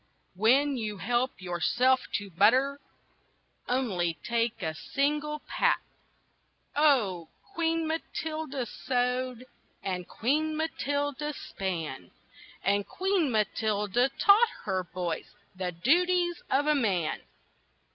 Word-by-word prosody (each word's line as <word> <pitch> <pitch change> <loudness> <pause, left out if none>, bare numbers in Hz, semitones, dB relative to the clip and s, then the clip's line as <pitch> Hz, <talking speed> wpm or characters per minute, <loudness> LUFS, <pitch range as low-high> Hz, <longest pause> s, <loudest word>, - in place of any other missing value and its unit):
When 260 +8 +3
you 215 -3 -3
help 240 +2 0
yourself 240 +9 +2 0.2
to 205 -1 -3
butter, 255 - +4 0.9
Only 190 - 0
take 235 -2 -1
a 160 -2 -1
single 295 - -1
pat!" - - +2 1.0
Oh! 230 - +3 0.2
Queen 330 -2 0
Matilda 315 -4 -3
sewed, 250 +1 -1 0.4
And 180 -2 -3
Queen 305 +6 0
Matilda 290 -2 -2
span, 165 - -4 0.5
And 200 +1 +1
Queen 380 -5 +1
Matilda 215 +1 +1
taught 430 +3 +6
her 190 -3 -1
boys 175 -3 -4 0.2
The 185 -1 -2
duties 345 - +2
of 285 +2 +2
a 300 - +4
man. 195 - 0
250 Hz, 100 wpm, -29 LUFS, 195-295 Hz, 1.0 s, taught